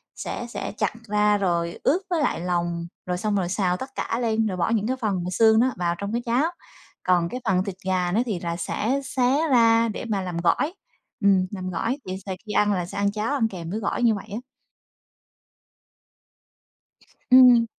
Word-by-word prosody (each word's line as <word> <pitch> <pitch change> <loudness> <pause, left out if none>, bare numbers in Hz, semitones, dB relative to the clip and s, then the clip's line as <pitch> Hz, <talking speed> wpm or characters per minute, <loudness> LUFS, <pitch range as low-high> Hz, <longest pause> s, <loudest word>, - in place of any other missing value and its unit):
sẽ - - -5
sẽ - - -5
chặt - - 0
ra 210 0 +3
rồi 170 -3 -1
ướp 340 +7 +3
với 335 -4 +1
lại - - 0
lòng 170 -1 -1 0.2
rồi 180 0 -2
xong 210 +2 -1
rồi 180 -3 0
xào 180 -2 0
tất 260 - -6
cả 230 - -2
lên, 225 -2 +1
rồi 185 -3 -3
bỏ 175 - +1
những 220 -1 +1
cái 260 - 0
phần 210 -4 0
mà 180 - -3
xương 220 +3 +5
nó 255 +2 +3
vào 175 -1 0
trong 200 +2 -4
cái 235 - 0
cháo. 245 +5 +2 0.6
Còn 175 -2 +2
cái 250 - -5
phần 185 -3 +2
thịt 195 -2 -5
gà 185 -2 0
nó 220 +5 +2
thì 210 -7 -2
là 170 -1 -3
sẽ 240 +9 -1
xé 270 +3 +1
ra 230 -2 +5
để 215 - -5
mà 200 -2 0
làm 180 -2 -4
gỏi, 235 - +1 0.5
ừm, 195 -2 +4
làm 185 -3 -5
gỏi 230 +9 -1
vậy 185 0 -4
thì 190 - -2
khi - - -4
ăn 210 0 +3
là 180 -3 -1
sẽ 185 - -8
ăn 200 0 +1
cháo 215 +6 -2
ăn 235 -6 +2
kèm 175 -6 -7
với 210 +5 -3
gỏi 220 +3 -2
như 225 -3 +4
vậy 205 - -8
á. 210 - -3 2.9
Ừm. 250 -2 +8
205 Hz, 210 wpm, -24 LUFS, 180-230 Hz, 2.9 s, Ừm